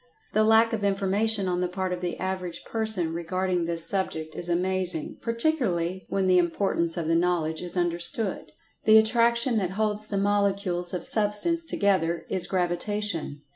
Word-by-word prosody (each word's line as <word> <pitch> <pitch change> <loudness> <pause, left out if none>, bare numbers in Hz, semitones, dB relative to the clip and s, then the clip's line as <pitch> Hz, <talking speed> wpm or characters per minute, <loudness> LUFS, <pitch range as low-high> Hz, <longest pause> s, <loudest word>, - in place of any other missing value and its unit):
The 215 - +3
lack 225 +1 +4
of 215 -2 -2
information 200 +1 +1
on 180 0 -1
the 180 - +1
part 185 0 -3
of 180 - -5
the 175 -1 -3
average 185 -2 -4
person 215 -7 -2
regarding 180 +1 -1
this 165 -1 -1
subject 160 -5 -3
is 175 - -1
amazing, 180 -2 -1
particu[Pg 240 +8 0
138]larly 180 -5 -1
when 195 -1 0
the 185 -1 +5
importance 170 -1 0
of 165 -2 -2
the 165 - +2
knowledge 165 -2 0
is 180 +1 -5
understood. 175 +4 -1 0.3
The 220 +1 +7
attraction 235 +2 +3
that 185 -3 -1
holds 215 0 -1
the 200 - -3
molecules 200 -3 0
of 180 - -5
Substance 215 +11 +1
together 190 - 0
is 185 -2 +1
Gravitation. 180 -4 -2
185 Hz, 165 wpm, -26 LUFS, 175-210 Hz, 0.3 s, The